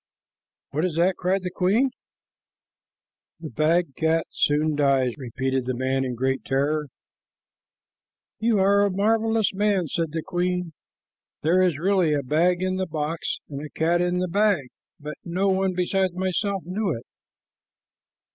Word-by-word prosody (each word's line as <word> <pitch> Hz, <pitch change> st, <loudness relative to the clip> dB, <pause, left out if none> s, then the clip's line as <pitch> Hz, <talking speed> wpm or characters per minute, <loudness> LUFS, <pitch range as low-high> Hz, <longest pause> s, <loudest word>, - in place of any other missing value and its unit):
"What 155 Hz, +3 st, -1 dB
is 180 Hz, -4 st, -1 dB
that?" 175 Hz, +3 st, +2 dB
cried 185 Hz, +1 st, 0 dB
the 180 Hz, -, -3 dB
queen. 205 Hz, +9 st, +2 dB, 1.5 s
"The 160 Hz, -4 st, -7 dB
bagged 155 Hz, +2 st, +1 dB
cat 160 Hz, 0 st, +1 dB
soon 150 Hz, +1 st, +1 dB
dies," 135 Hz, -4 st, +2 dB
repeated 130 Hz, 0 st, -2 dB
the 130 Hz, 0 st, -2 dB
man 130 Hz, +1 st, 0 dB
in 125 Hz, -2 st, -3 dB
great 130 Hz, +2 st, -1 dB
terror. 145 Hz, +3 st, 0 dB, 1.5 s
"You 225 Hz, 0 st, +2 dB
are 200 Hz, +1 st, +4 dB
a 205 Hz, -, +2 dB
marvelous 220 Hz, +2 st, +1 dB
man," 200 Hz, -2 st, +1 dB
said 165 Hz, 0 st, -2 dB
the 160 Hz, 0 st, -3 dB
queen. 180 Hz, -1 st, -2 dB, 0.7 s
"There 175 Hz, +4 st, +3 dB
is 180 Hz, -5 st, +2 dB
really 180 Hz, -2 st, +2 dB
a 140 Hz, -, -1 dB
bag 175 Hz, +7 st, +2 dB
in 185 Hz, 0 st, 0 dB
the 185 Hz, 0 st, -1 dB
box 155 Hz, 0 st, -3 dB
and 140 Hz, 0 st, -6 dB
a 150 Hz, -, -7 dB
cat 170 Hz, +3 st, +1 dB
in 180 Hz, 0 st, 0 dB
the 180 Hz, 0 st, 0 dB
bag, 195 Hz, -7 st, +1 dB, 0.3 s
but 150 Hz, +1 st, -7 dB
no 185 Hz, +3 st, 0 dB
one 190 Hz, 0 st, +1 dB
besides 185 Hz, 0 st, 0 dB
myself 190 Hz, +1 st, -1 dB
knew 195 Hz, +3 st, -2 dB
it." 115 Hz, -, -11 dB
175 Hz, 150 wpm, -24 LUFS, 150-190 Hz, 1.5 s, are